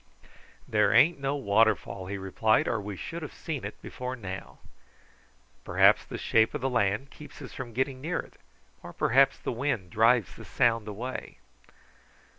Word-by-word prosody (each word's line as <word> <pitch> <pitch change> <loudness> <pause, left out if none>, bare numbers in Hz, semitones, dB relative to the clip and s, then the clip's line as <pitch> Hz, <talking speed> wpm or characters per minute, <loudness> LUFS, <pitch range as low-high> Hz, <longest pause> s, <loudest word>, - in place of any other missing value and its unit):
"There - - +3
ain't 165 +1 +5
no 140 +1 -1
waterfall," 100 -5 +1
he 100 +1 -4
replied, 100 +3 +1
"or 115 - 0
we 100 0 -6
should 170 - -6
have 155 - -8
seen 155 - -5
it 105 - -7
before 125 0 -5
now." 95 -5 -8 1.1
"Perhaps - - +4
the - - -6
shape 110 +5 +2
of 150 - -3
the 135 0 -1
land 115 +3 0
keeps 150 - -13
us 135 - -9
from 125 -3 -7
getting 130 +2 -2
near 160 +4 -2
it, - - -6 0.5
or - - -10
perhaps 135 +3 +3
the - - -4
wind 120 -8 -2
drives 115 -1 +3
the - - -11
sound 115 -2 +1
away." 115 +5 -6
120 Hz, 165 wpm, -28 LUFS, 105-135 Hz, 1.1 s, ain't